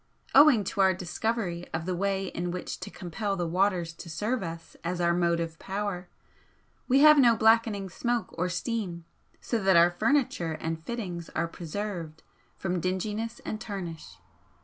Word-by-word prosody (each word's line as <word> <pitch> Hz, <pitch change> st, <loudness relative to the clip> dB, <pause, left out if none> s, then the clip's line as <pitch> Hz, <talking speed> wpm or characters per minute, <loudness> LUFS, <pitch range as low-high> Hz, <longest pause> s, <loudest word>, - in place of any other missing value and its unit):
Owing 275 Hz, -6 st, +7 dB
to 195 Hz, +1 st, -1 dB
our 190 Hz, -1 st, +4 dB
discovery 180 Hz, 0 st, -2 dB
of 160 Hz, 0 st, -3 dB
the 185 Hz, 0 st, -1 dB
way 195 Hz, +1 st, 0 dB
in 175 Hz, +1 st, -3 dB
which 180 Hz, +1 st, -5 dB
to -, -, -6 dB
compel 195 Hz, +3 st, -3 dB
the 175 Hz, -2 st, -1 dB
waters 180 Hz, -1 st, +1 dB
to 170 Hz, +1 st, -10 dB
serve 215 Hz, +11 st, -1 dB
us 165 Hz, -2 st, -7 dB
as 175 Hz, +1 st, -2 dB
our 170 Hz, 0 st, +3 dB
motive 170 Hz, -2 st, 0 dB
power, 195 Hz, -2 st, -4 dB, 0.8 s
we 270 Hz, +2 st, +4 dB
have 305 Hz, 0 st, +8 dB
no 240 Hz, -4 st, +6 dB
blackening 220 Hz, -3 st, +3 dB
smoke 240 Hz, +5 st, -2 dB
or 180 Hz, +2 st, -1 dB
steam, 180 Hz, -3 st, -3 dB, 0.4 s
so 230 Hz, -3 st, -1 dB
that 190 Hz, -2 st, +5 dB
our 170 Hz, +1 st, +6 dB
furniture 175 Hz, -, +1 dB
and 160 Hz, 0 st, -4 dB
fittings 180 Hz, -7 st, -5 dB
are 170 Hz, +1 st, +1 dB
preserved 170 Hz, -2 st, -5 dB, 0.3 s
from 180 Hz, -1 st, -1 dB
dinginess 210 Hz, +6 st, -2 dB
and 215 Hz, -, -4 dB
tarnish. 175 Hz, -6 st, -6 dB
185 Hz, 160 wpm, -28 LUFS, 170-215 Hz, 0.8 s, have